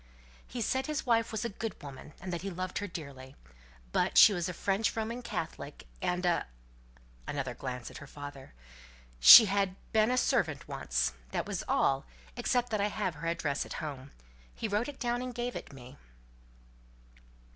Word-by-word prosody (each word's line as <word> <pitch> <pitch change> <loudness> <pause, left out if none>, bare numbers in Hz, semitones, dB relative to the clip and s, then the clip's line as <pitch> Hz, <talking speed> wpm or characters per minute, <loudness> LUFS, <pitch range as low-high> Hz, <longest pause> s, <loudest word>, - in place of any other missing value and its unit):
"He 245 - -5
said 260 +4 0
his 305 -1 -2
wife 230 -2 +2
was 220 +1 -3
a - - -1
good 215 +1 -5
woman, 140 +1 -10
and 180 +1 -6
that 170 - -3
he 195 - -4
loved 185 0 -4
her 205 - -4
dearly; 140 -6 -9 0.6
but - - +1
she 210 - +9
was 175 -2 -2
a - - -4
French 200 +4 0
Roman 230 +2 -3
Catholic, 190 -9 -6 0.2
and 180 +1 -1
a" 175 -1 +1 0.8
another 135 -3 -3
glance 125 -1 -6
at - - -9
her 140 - -11
father 145 -1 -9 0.7
"she 140 - +12
had 195 -2 0 0.2
been 220 0 +4
a 250 - +1
servant - - +1
once. - - -1 0.2
That - - -2
was - - -3
all; 135 0 +1 0.3
except 245 0 0
that 215 -2 0
I 205 - +2
have 205 -3 -2
her 160 +2 -6
address 165 -4 -1
at - - -8
home. 140 -4 -6 0.5
He - - -3
wrote 210 +3 0
it 285 - -9
down 240 -1 -1
and 250 -1 -5
gave 245 0 -3
it - - -7
me." 130 0 -12
185 Hz, 180 wpm, -31 LUFS, 145-225 Hz, 0.8 s, she